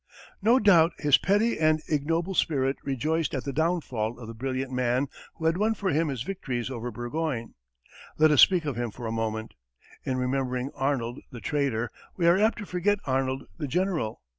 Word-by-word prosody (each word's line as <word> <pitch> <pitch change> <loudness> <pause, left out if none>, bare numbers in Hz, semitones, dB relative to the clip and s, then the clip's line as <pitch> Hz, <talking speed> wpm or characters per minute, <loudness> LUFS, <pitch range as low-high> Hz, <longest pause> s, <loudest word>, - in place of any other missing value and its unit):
No 230 +5 +5
doubt 175 -7 +5
his 145 -3 +4
petty 205 +3 +2
and 155 0 +3
ignoble 165 +5 0
spirit 135 -6 +1
rejoiced 150 +4 -1
at 130 - -2
the 140 - -4
downfall 130 -8 -1
of 120 -2 -9
the 115 - -7
brilliant 130 +2 -3
man 125 +1 +1 0.3
who 160 - -6
had 165 +2 +3
won 220 +3 +1
for 195 -2 -1
him 160 +2 +1
his 130 -5 -3
victories 135 -9 -4
over 120 -1 -4
Burgoyne. 120 +1 -3 0.6
Let 155 0 +5
us 145 - +6
speak 180 -4 +5
of 145 -4 -2
him 120 0 -2
for 120 +3 -9
a 110 - -2
moment. 110 -1 -3 0.5
In 130 -1 -1
remembering 130 0 -1
Arnold 130 -3 -1
the 120 - -8
traitor, 120 -1 -1 0.3
we 175 - +1
are 170 +3 +5
apt 220 +2 +3
to 210 - -6
forget 195 +3 +1
Arnold 130 0 0 0.2
the 150 - -2
general. 165 - -1
140 Hz, 190 wpm, -27 LUFS, 125-165 Hz, 0.6 s, us